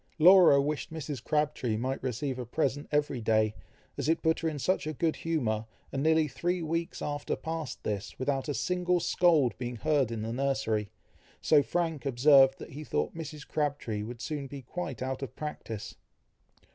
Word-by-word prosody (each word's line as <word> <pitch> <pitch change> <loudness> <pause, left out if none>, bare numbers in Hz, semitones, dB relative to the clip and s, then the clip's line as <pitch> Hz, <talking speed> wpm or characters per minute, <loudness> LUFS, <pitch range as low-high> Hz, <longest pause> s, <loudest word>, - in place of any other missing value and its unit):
Laura 175 -3 +8
wished 145 +2 -2
Mrs. 145 -5 -5
Crabtree 150 -7 0
might 130 +4 -2
receive 130 +1 -2
a 125 - -4
present 145 +2 -1
every 145 -4 0
day, 110 -1 +2 0.5
as - - 0
it 165 - +1
put 160 0 +2
her 165 - 0
in 150 - -5
such 155 +4 0
good 165 -2 +1
humour, 115 -10 -1 0.2
and 135 - -2
nearly 160 0 +3
three 175 +6 -2
weeks 165 +3 -2
after 145 -1 -2
passed 160 -3 -5
this, 105 +1 -4
without 135 +2 -1
a 145 - -1
single 180 0 +1
scold 160 - +3
being 120 -1 -4
heard 145 0 +1
in 110 -2 -3
the 115 +1 -3
nursery; 125 -6 0 0.5
so 150 -2 +5
Frank 165 0 -1
observed 135 +1 +6
that - - -10
he 150 +3 -7
thought - - -1
Mrs. 155 -2 -7
Crabtree 145 -8 -2
would 115 +2 -7
soon 145 +2 -4
be 135 0 -8
quite 130 -3 -5
out 130 +1 -3
of 135 -5 -6
practice. 115 -8 -6
145 Hz, 175 wpm, -30 LUFS, 125-160 Hz, 0.5 s, Laura